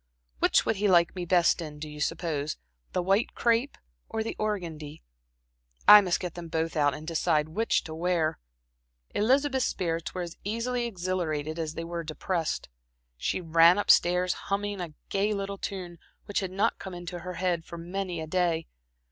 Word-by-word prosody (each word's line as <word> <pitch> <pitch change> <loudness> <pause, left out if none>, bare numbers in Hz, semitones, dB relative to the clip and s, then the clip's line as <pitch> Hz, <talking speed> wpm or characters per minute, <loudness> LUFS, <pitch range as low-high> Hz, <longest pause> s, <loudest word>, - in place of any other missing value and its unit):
Which - - +4
would 220 - +1
he 205 +1 +2
like 170 -2 +4
me 180 -1 -3
best 175 0 +3
in, 150 -2 -7
do 155 +1 -6
you 150 0 -8
suppose 155 -2 -2 0.3
the 180 - 0
white 195 +5 +1
crepe 235 +4 +1 0.3
or 220 - -2
the 225 - -4
organdie? 170 - -4 0.8
I 210 0 +11
must 180 -3 0
get 180 -3 -4
them 175 -1 -7
both 160 0 -2
out, 145 -2 +2
and 155 +1 -9
decide 155 -2 +1
which 225 +8 +1
to 160 - -7
wear." 165 -1 0 0.7
Elizabeth's 265 +4 +2
spirits 165 -2 -2
were 180 - -2
as 170 -1 -8
easily 235 +3 -1
exhilarated 175 -6 -2
as 160 -1 -3
they 165 - -4
were 170 0 -4
depressed. 160 +1 -2 0.5
She - - -2
ran 165 +2 +6
up 205 - +5
stairs, 180 +1 +4 0.2
humming 200 -1 -1
a 165 -4 -6
gay 205 +2 +1
little 200 0 -4
tune 180 -4 -5 0.3
which 205 - -1
had 190 - -3
not 200 +5 0
come 190 -2 -7
into 175 0 -6
her 180 +1 -6
head 175 -1 0
for 170 - -9
many 180 0 -4
a - - -4
day. 165 -1 0
175 Hz, 180 wpm, -28 LUFS, 165-195 Hz, 0.8 s, I